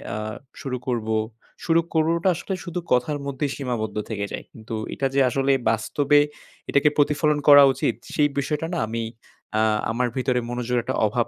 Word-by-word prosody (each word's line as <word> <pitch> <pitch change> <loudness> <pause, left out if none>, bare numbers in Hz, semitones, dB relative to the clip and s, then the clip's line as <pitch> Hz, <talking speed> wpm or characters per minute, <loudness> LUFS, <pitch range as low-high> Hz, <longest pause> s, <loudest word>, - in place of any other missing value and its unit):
আ - - -3 0.4
শুরু 130 -2 -3
করব। 115 -3 -1 0.6
শুরু 165 0 +4
করবটা 165 +3 +2
আসলে 175 +3 -4
শুধু 175 +1 -4
কথার 125 +4 +2
মধ্যেই 140 0 -2
সীমাবদ্ধ 115 -6 -3
থেকে 100 -2 -2
যায়। - - -5
কিন্তু 110 0 -7 0.2
এটা 135 - 0
যে - - +4
আসলে 135 +2 +1 0.2
বাস্তবে 140 +6 +2 0.5
এটাকে 140 +1 +4
প্রতিফলন 150 +1 +2
করা 145 -1 +10
উচিত। - - 0 0.2
সেই 145 -1 +3
বিষয়টা 150 +3 -2
না 170 - -1
আমি 115 +1 -3 0.6
আ - - +3 0.3
আমার 125 +2 0
ভিতরে 125 -1 +1
মনোযোগের 120 0 -1
একটা 130 +2 -2
অভাব 115 +3 0
135 Hz, 165 wpm, -24 LUFS, 120-150 Hz, 0.6 s, করা